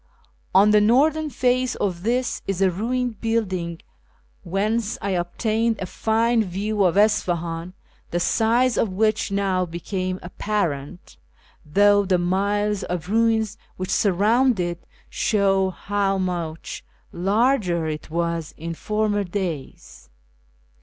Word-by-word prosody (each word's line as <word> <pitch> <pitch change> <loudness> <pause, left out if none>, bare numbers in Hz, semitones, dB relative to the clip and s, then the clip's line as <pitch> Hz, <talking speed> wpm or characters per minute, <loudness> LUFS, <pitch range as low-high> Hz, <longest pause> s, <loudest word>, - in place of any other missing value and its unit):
On 200 +2 +6
the 210 0 +5
northern 300 +8 +3
face 255 0 +1
of 180 -4 -2
this 245 +4 -1
is 195 -2 -2
a 190 -1 +3
ruined 240 +4 -2
building, 185 -7 -2 0.6
whence 210 +4 -1
I 200 - -2
obtained 220 +6 0
a 185 - -3
fine 225 +4 +1
view 200 +2 -1
of 180 0 +2
Isfahan, 175 -4 +1 0.4
the 175 - -1
size 235 +6 +2
of 225 - +2
which 215 +2 0
now 195 -2 +1
became 185 +2 -4
apparent, 175 -4 -3 0.5
though 205 +6 +4
the 185 -2 +2
miles 200 +3 0
of 180 0 -4
ruins 220 -1 +1 0.2
which 185 0 -4
surround 215 +5 +3
it 175 -1 -3 0.2
show 195 -3 +1
how 195 +1 -1
much 175 -4 -4 0.3
larger 195 -2 +1
it 155 -1 -5
was 170 -1 -2
in 165 +1 -5
former 210 +3 -1
days. 175 - -6
200 Hz, 120 wpm, -23 LUFS, 175-220 Hz, 0.6 s, On